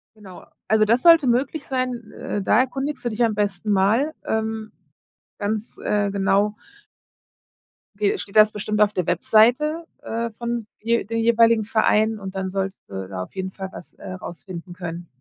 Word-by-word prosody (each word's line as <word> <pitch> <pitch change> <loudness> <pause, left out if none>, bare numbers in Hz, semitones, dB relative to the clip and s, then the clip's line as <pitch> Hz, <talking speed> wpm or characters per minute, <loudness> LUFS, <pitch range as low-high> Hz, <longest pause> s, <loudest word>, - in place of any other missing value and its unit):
Genau, 195 -4 -13 0.2
also 215 0 +4
das 230 +4 +3
sollte 330 -5 +7
möglich 265 +5 0
sein. 255 -4 -3
Äh, 205 - -4
da 210 - +3
erkundigst 270 +3 -2
du - - +1
dich 230 +1 0
am 225 -2 +1
besten 205 0 -1
mal, 215 +10 +2
ähm, 220 0 -2 0.7
ganz, 215 +2 -3
äh, 205 -1 +1
genau 200 +1 +1 1.4
ge 205 0 +1
steht 195 - -8
das 215 0 +7
bestimmt 210 0 -2
auf 210 -1 +5
der 180 -3 -2
Webseite, 245 - +3 0.2
äh, 230 +1 -2
von 235 -2 -3 0.2
de 235 +1 +1
den 230 +3 -2
jeweiligen 230 -1 +4
Verein 220 0 +2
und 195 -1 -7
dann 190 0 -2
solltest 195 0 -3
du 95 -1 -5
da 95 -1 -5
auf - - -14
jeden 190 0 -3
Fall 190 0 -7
was, 175 - -11
äh, - - -10
rausfinden 175 -1 -8
können. 175 -1 -7
215 Hz, 170 wpm, -23 LUFS, 195-235 Hz, 1.4 s, sollte